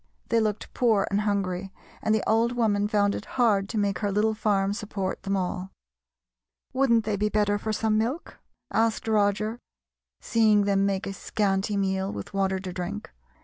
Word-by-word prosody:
They 230 - +3
looked 215 -2 -2
poor 225 -5 +2
and 200 +1 +2
hungry, 195 -2 -1 0.3
and 220 - +2
the 215 - -1
old 230 +2 +2
woman 210 -4 +1
found 205 -1 +2
it - - -5
hard 205 -5 +3
to 225 - -3
make 200 -2 0
her 205 -1 -1
little 215 +2 +2
farm 200 -2 +1
support 205 -3 -4
them 195 0 -1
all. 185 0 -3 1.0
"Wouldn't 240 -4 +3
they 215 -1 0
be 210 +1 0
better 205 -1 +1
for 220 - -3
some 215 0 +1
milk?" 255 +10 -3 0.3
asked 225 0 +1
Roger, 215 +1 +1 0.6
seeing 215 -2 +3
them 200 0 +2
make 195 -1 -1
a 195 - -4
scanty 200 0 -1
meal, 190 0 0
with - - -7
water 195 -1 +1
to 185 -2 -6
drink. 190 +4 -5
205 Hz, 175 wpm, -26 LUFS, 195-220 Hz, 1.0 s, They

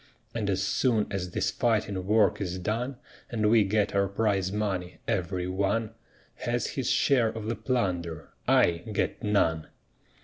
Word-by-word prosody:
And 110 -4 -2
as 95 0 +1
soon 110 +1 +2
as 95 -2 -2
this - - -1
fighting 105 -6 0
work 105 -3 +3
is 90 -2 -2
done, 115 +8 -2 0.3
And 110 -2 +1
we 115 -2 +6
get 105 +1 +1
our 100 0 +2
prize 100 -2 0
money, 95 -4 -2
every 90 0 -1
one 100 +4 0 0.5
Has - - -1
his - - -2
share 125 -5 +3
of 110 -1 -6
the 115 +2 -1
plunder 90 - -2 0.2
I 85 -1 +4
get 100 - -1
none." 85 -7 +1
100 Hz, 150 wpm, -28 LUFS, 95-110 Hz, 0.5 s, we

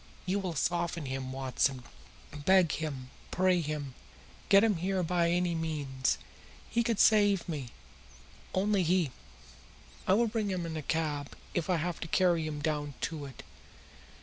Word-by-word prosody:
You 195 +2 0
will 185 -4 -3
soften 170 +1 0
him, 130 0 -4
Watson. 130 0 0 0.5
Beg 170 +4 +4
him, 135 -5 -4 0.2
pray 185 -1 +3
him, 145 -3 -4 0.6
get 200 +1 +7
him 215 -5 +3
here 185 +2 0
by 170 0 +2
any 175 0 +1
means. 145 -5 -1 0.5
He 235 - +2
can 230 -2 0
save 205 -3 +4
me 145 -7 -4 0.9
only 200 +1 +2
he!" 175 -4 +2 1.0
"I 190 - +5
will 235 +3 +4
bring 220 -2 -1
him 180 -3 -2
in 165 -1 -4
a 155 - -3
cab, 150 -2 -2 0.2
if 175 -1 -1
I 180 - +4
have 170 +2 -2
to - - -5
carry 170 -2 +2
him 150 -1 -4
down 150 -3 -1
to 155 -3 -3
it." 135 - -11
165 Hz, 155 wpm, -31 LUFS, 145-185 Hz, 1.0 s, get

